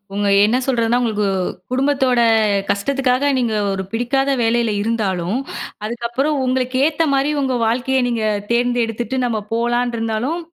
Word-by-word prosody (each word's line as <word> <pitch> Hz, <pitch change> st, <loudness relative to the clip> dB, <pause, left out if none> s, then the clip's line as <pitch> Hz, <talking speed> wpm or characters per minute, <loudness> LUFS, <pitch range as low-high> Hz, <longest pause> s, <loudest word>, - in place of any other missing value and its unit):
உங்க 205 Hz, 0 st, 0 dB, 0.2 s
என்ன 220 Hz, +4 st, +3 dB
சொல்றதுன்னா, 235 Hz, -2 st, +1 dB
உங்களுக்கு 215 Hz, -3 st, 0 dB, 0.5 s
குடும்பத்தோட 265 Hz, -2 st, +2 dB, 0.5 s
கஷ்டத்துக்காக 265 Hz, +5 st, +1 dB
நீங்க 240 Hz, -3 st, 0 dB, 0.2 s
ஒரு 190 Hz, -1 st, -2 dB
பிடிக்காத 245 Hz, +4 st, 0 dB
வேலையில 230 Hz, 0 st, +1 dB
இருந்தாலும், 205 Hz, -3 st, -1 dB, 0.5 s
அதுக்கப்புறம் 240 Hz, +6 st, -1 dB
உங்களுக்கு 255 Hz, 0 st, 0 dB
ஏத்த 320 Hz, +1 st, +1 dB
மாரி 275 Hz, +2 st, +1 dB
உங்க 265 Hz, -2 st, 0 dB
வாழ்க்கைய 255 Hz, +3 st, +1 dB
நீங்க 235 Hz, -2 st, -1 dB, 0.3 s
தேர்ந்தெடுத்துட்டு 240 Hz, 0 st, 0 dB
நம்ம 230 Hz, -3 st, -1 dB
போலான்னு 240 Hz, +1 st, 0 dB
இருந்தாலும் 225 Hz, +9 st, -2 dB
240 Hz, 125 wpm, -19 LUFS, 225-265 Hz, 0.5 s, என்ன